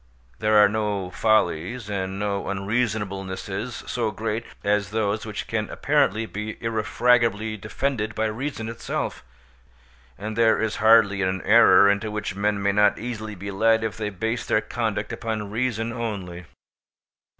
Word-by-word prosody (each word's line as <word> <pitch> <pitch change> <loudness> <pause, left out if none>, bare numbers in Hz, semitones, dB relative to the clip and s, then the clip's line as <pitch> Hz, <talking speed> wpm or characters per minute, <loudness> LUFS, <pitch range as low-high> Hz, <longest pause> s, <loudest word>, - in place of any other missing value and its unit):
There 110 0 +3
are 105 -1 +8
no 100 -3 -2
follies 110 +1 +1
and 95 -2 -3
no 100 -1 -2
unreasonablenesses 100 0 -3
so 115 -3 -1
great 110 +2 -3 0.2
as 100 -2 +1
those 105 0 -1
which 105 - -5
can - - -2
apparently 110 +3 +1
be 105 0 -6
irrefragably 115 -1 +1
defended 110 0 -3
by 110 - 0
reason 115 +1 -3
itself, 115 +1 -4 0.9
and 110 +1 -5
there 115 -1 +4
is 110 -1 -1
hardly 110 -2 +5
an 95 0 -1
error 100 - +7
into 100 +2 +1
which 105 -2 -4
men 100 0 0
may 100 - +3
not 105 0 +3
easily 110 -2 -5
be 100 +2 -6
led 110 +3 +3
if 110 - -2
they 105 -2 -3
base 110 +4 -2
their - - +2
conduct 110 -1 -3
upon 110 -3 -4
reason 115 0 -1
only. 95 -7 -5
105 Hz, 145 wpm, -24 LUFS, 100-115 Hz, 0.9 s, are